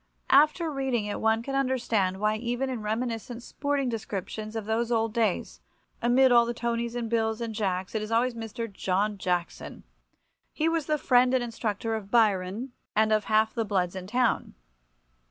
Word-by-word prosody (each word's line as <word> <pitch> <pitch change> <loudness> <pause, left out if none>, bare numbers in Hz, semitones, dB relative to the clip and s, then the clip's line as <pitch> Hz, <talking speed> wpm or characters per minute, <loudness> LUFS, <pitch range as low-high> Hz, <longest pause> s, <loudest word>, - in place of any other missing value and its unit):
After 305 +4 +4
reading 265 -6 -1
it 205 - -4
one 220 +1 +2
can 275 - -5
understand 235 -8 0
why 215 +1 +1
even 245 +3 -2
in 245 -4 -4
reminiscent 230 +2 -3
sporting 285 -1 -1
descriptions 215 -1 -5
of 220 -2 -3
those 225 +2 -1
old 225 -2 +1
days, 195 - -1 0.4
amid 255 +2 +4
all 235 -1 +6
the 240 - -3
Tonis 235 0 -2
and 240 -1 -2
Bills 220 -1 0
and 230 -1 -4
Jacks, 190 -4 -2
it 220 - -1
is 215 +1 -5
always 240 +2 +2
Mr. 230 +1 -5
John 195 +2 -1
Jackson. 180 -2 -3 0.7
He 315 - 0
was 330 -3 0
the 305 -1 +2
friend 250 -2 +4
and 255 - +1
instructor 225 -1 -3
of 215 -3 -4
Byron 215 +1 +1 0.2
and 220 0 +3
of 215 -2 +1
half 220 0 +2
the 230 - 0
bloods 190 -4 -1
in 185 -1 -6
town. 245 +3 0
225 Hz, 175 wpm, -27 LUFS, 210-245 Hz, 0.7 s, all